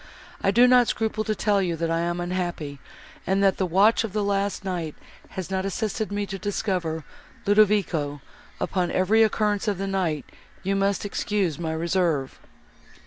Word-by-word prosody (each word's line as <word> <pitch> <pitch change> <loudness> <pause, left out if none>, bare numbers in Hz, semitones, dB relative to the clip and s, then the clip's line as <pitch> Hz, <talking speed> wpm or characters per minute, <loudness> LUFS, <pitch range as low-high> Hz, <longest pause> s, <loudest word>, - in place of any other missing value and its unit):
I - - +2
do 235 +5 +6
not 250 -1 +6
scruple 220 -1 -1
to 215 0 0
tell 205 -2 +2
you, 175 -3 0
that 165 0 -2
I 165 - +1
am 175 +1 -1
unhappy, 175 -5 -3 0.5
and 195 +1 +2
that 195 -2 +3
the 190 - 0
watch 200 +7 +4
of 220 -4 -5
the 210 -1 0
last 200 0 -1
night 170 -5 -3 0.4
has 190 0 -4
not 190 0 0
assisted 215 +2 -2
me 205 0 -1
to 195 -1 -6
discover 180 -5 -2 0.4
Ludovico; 200 -8 +2 0.4
upon 180 -2 0
every 200 +5 +3
occurrence 210 -1 +2
of 205 -3 +1
the 195 - -3
night 180 -7 -1 0.4
you 195 +1 0
must 195 0 +1
excuse 200 -5 -1
my 160 -2 -2
reserve." 165 -4 0
195 Hz, 170 wpm, -25 LUFS, 170-205 Hz, 0.5 s, do